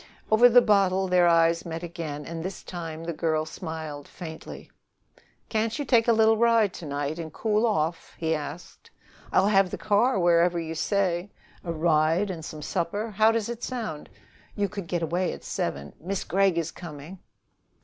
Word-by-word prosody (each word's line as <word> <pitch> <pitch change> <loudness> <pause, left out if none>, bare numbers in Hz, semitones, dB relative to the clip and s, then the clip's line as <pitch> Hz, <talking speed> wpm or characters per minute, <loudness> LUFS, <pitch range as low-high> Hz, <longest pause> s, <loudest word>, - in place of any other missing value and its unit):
Over 235 +3 +7
the 245 +1 +7
bottle 195 -2 +3
their 180 -1 +4
eyes 165 0 +4
met 165 0 -6
again, 155 -4 -6
and 165 +1 -5
this 185 +2 -6
time 165 -2 -6
the 170 0 -3
girl 155 -1 0
smiled 160 -3 -7
faintly. 160 -3 -9 0.8
"Can't 220 +2 -1
you 290 - -3
take 235 -3 +3
a - - +6
little 220 0 +4
ride 230 -3 +3
to 165 - -8
night 145 +3 -3
and 160 -2 -6
cool 215 +5 +1
off? 165 -6 -2 1.1
I'll 190 - +4
have 195 -2 +4
the - - -5
car 215 +3 +2
wherever 175 -1 +3
you 165 -1 -4
say. 185 +1 0 0.3
A 170 - -3
ride 165 +4 +2
and 165 -3 -7
some 155 -1 -7
supper 205 +9 -2
how 215 +2 +4
does 225 -2 -1
it 235 0 -6
sound? 220 - -5 0.5
You 205 -1 0
could 195 -2 -7
get 170 0 -1
away 175 +3 0
at - - -10
seven 70 +1 -4
" - - -34
"Miss 190 +4 -3
Gregg 195 0 +2
is 165 -1 -1
coming!" 165 +2 -10
175 Hz, 175 wpm, -26 LUFS, 160-210 Hz, 1.1 s, Over